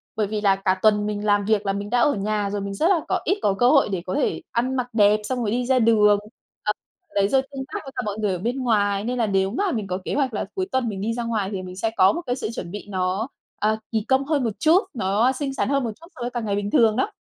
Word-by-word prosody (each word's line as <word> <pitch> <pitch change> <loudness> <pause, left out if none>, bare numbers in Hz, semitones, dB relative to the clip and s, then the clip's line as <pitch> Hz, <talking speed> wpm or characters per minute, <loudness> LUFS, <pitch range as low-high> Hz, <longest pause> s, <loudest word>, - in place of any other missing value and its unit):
Bởi 215 -2 0
vì 210 +1 -3
là 200 -2 +4
cả 190 -1 0
tuần 210 -1 +4
mình 210 0 -3
làm 205 -1 +2
việc 210 -1 +1
là 195 - +1
mình 200 +1 -4
đã 245 +2 +2
ở 290 +3 +4
nhà 205 0 -1
rồi, 205 0 -3
mình 200 0 -4
rất 315 - +1
là 360 -5 +3
có - - +1
ít 385 +5 +2
có 200 - +2
cơ 245 +1 +5
hội 275 -5 +4
để 190 -3 -2
có 185 - -3
thể - - 0
ăn 255 +3 0
mặc 250 -1 -1
đẹp 210 -1 +4
xong 255 +3 -2
rồi 220 -4 -1
đi 245 +2 0
ra 260 0 +3
đường. 210 -3 +5 0.5
Ờ 210 - +2 0.4
đấy 200 -1 +3
rồi 265 +5 +3
tương 270 -1 -5
tác - - -2
với 270 - -9
cả - - -1
mọi 205 0 -3
người 210 -3 0
ở - - -2
bên 240 +8 -2
ngoài 205 -4 +1
nên 250 +3 -2
là 230 -2 +1
nếu 195 -1 +1
mà 380 - 0
mình 215 -5 -2
có 185 0 -2
kế - - -2
hoạch 270 -5 0
là 205 - -2
cuối 375 - -1
tuần 260 -3 0
mình 195 -2 -5
đi 225 +3 -1
ra 235 0 -3
ngoài 215 -4 -1
thì 190 - -3
mình 185 0 -8
sẽ 220 +4 -1
có 190 +1 +6
một 345 - -3
cái 245 -1 -1
sự 265 - -4
chuẩn 170 -1 -6
bị 205 0 -7
nó, 190 +3 -1 0.3
ờ, 215 +1 +2
kỳ 220 -2 -1
công 265 +1 +2
hơn 290 -3 +1
một 225 - -1
chút, 325 +4 +5
nó 215 +3 +2
xinh 270 0 -3
xắn 270 - -1
hơn 275 -2 +1
một 230 - -2
chút 335 - -13
so 250 - -11
với 240 - -1
cả 240 0 -3
ngày 210 -3 -1
bình 205 0 -2
thường 220 -2 +4
đó! 395 - 0
215 Hz, 310 wpm, -23 LUFS, 200-250 Hz, 0.5 s, có